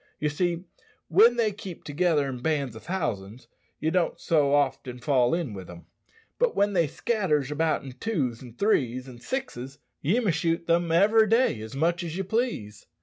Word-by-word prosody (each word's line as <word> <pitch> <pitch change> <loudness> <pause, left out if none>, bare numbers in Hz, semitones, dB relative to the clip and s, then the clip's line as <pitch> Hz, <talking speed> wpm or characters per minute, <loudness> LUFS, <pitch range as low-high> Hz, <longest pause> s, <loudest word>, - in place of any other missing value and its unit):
Ye 150 - 0
see, 170 +3 -1 0.5
when 220 +8 +6
they 230 -3 +2
keep 195 -4 -9
together 150 -1 +1
in 130 -2 -5
bands 140 -5 -1
o' - - -8
thousands 120 - -4 0.3
ye 160 +2 0
don't 180 -1 0
so 150 -4 +2
often 130 -3 0
fall 125 +1 +2
in 165 -10 -3
wi' 95 -2 -7
them. 85 -1 -12 0.5
But - - +2
when 205 0 +2
they 170 -4 +3
scatters 150 - 0
about 155 +1 0
in 135 - -7
twos, 130 - -2
an' 120 -3 -11
threes, 130 - +1
an' 125 -2 -11
sixes 140 - -5 0.2
ye 185 - +2
may 215 -7 +1
shoot 165 0 0
them 170 0 +2
every 215 +6 +5
day 225 - +2
as 110 +3 -8
much 170 +4 +1
as 170 0 -5
ye 195 - -1
please." 195 - -2
160 Hz, 185 wpm, -26 LUFS, 130-190 Hz, 0.5 s, when